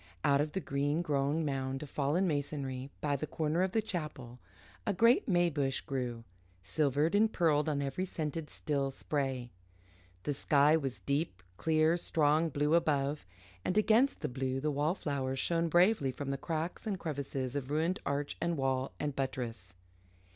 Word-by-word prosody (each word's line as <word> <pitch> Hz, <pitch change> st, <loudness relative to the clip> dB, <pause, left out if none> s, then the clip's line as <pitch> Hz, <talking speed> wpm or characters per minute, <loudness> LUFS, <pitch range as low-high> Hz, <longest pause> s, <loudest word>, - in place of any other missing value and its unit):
Out 140 Hz, -1 st, +4 dB
of 150 Hz, 0 st, -2 dB
the 190 Hz, -, 0 dB
green 145 Hz, +1 st, 0 dB
grown 145 Hz, +1 st, +1 dB
mound 135 Hz, -1 st, -2 dB
of 145 Hz, -, -9 dB
fallen 150 Hz, +7 st, +1 dB
masonry 140 Hz, -3 st, -2 dB
by 145 Hz, -1 st, +1 dB
the 155 Hz, +3 st, -3 dB
corner 160 Hz, +3 st, 0 dB
of 190 Hz, 0 st, +1 dB
the 220 Hz, +2 st, +1 dB
chapel 150 Hz, -, -5 dB, 0.4 s
a 205 Hz, -, -1 dB
great 235 Hz, -, +5 dB
may 175 Hz, -4 st, +4 dB
bush 140 Hz, -4 st, 0 dB
grew, 125 Hz, -4 st, -3 dB, 0.4 s
silvered 145 Hz, -, +1 dB
and 215 Hz, +2 st, +4 dB
pearled 155 Hz, -4 st, +2 dB
on 140 Hz, -2 st, 0 dB
every 140 Hz, +7 st, -2 dB
scented, 160 Hz, -3 st, -4 dB
still 140 Hz, -2 st, -1 dB
spray. 135 Hz, -3 st, -2 dB, 0.7 s
The 145 Hz, -, -1 dB
sky 145 Hz, +2 st, +4 dB
was 135 Hz, -5 st, -2 dB
deep, 140 Hz, -, -1 dB
clear, 160 Hz, -, +3 dB
strong 155 Hz, -1 st, +2 dB
blue 150 Hz, +1 st, +1 dB
above, 145 Hz, -, +1 dB, 0.4 s
and 185 Hz, -, 0 dB
against 225 Hz, +6 st, +4 dB
the -, -, -1 dB
blue, 130 Hz, +1 st, -2 dB
the 150 Hz, +2 st, 0 dB
wallflowers 145 Hz, -3 st, -1 dB
shone 165 Hz, +4 st, +1 dB
bravely 175 Hz, -4 st, +4 dB
from 135 Hz, +2 st, -4 dB
the -, -, 0 dB
cracks 165 Hz, +6 st, -3 dB
and 200 Hz, -3 st, -1 dB
crevices 140 Hz, -4 st, -3 dB
of 140 Hz, -2 st, -3 dB
ruined 160 Hz, +5 st, +1 dB
arch 140 Hz, +1 st, -2 dB
and 170 Hz, -1 st, 0 dB
wall 135 Hz, -1 st, 0 dB
and 145 Hz, -2 st, -2 dB
buttress. 120 Hz, -8 st, -4 dB
145 Hz, 165 wpm, -32 LUFS, 135-165 Hz, 0.7 s, great